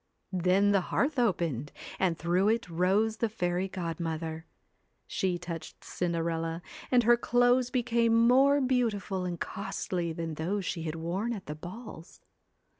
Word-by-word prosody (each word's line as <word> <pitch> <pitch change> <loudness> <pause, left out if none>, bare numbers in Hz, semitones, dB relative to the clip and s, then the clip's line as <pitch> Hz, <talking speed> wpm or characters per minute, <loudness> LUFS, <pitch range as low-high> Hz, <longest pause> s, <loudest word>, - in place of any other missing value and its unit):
Then 185 +3 +3
the 200 -2 +4
hearth 285 -1 +1
opened, 165 - 0 0.3
and 175 -4 +1
through 180 +5 +2
it 230 -1 +1
rose 190 +6 +1
the 230 - 0
fairy 180 -3 -1
godmother. 165 -3 -4 0.6
She 185 -2 -1
touched 170 -2 -7
Cinderella, 165 -1 -2 0.3
and 245 -1 +4
her 240 +1 +6
clothes 245 +1 +3
became 235 -2 +2
more 275 +3 +5
beautiful 220 -7 0
and 175 -2 -4
costly 180 -4 -3
than 165 0 -4
those 185 +6 -2
she 170 - -3
had 160 -1 -3
worn 180 +8 -2
at 200 -4 -7
the 150 - -5
balls. 175 +2 -10
185 Hz, 140 wpm, -29 LUFS, 170-230 Hz, 0.6 s, her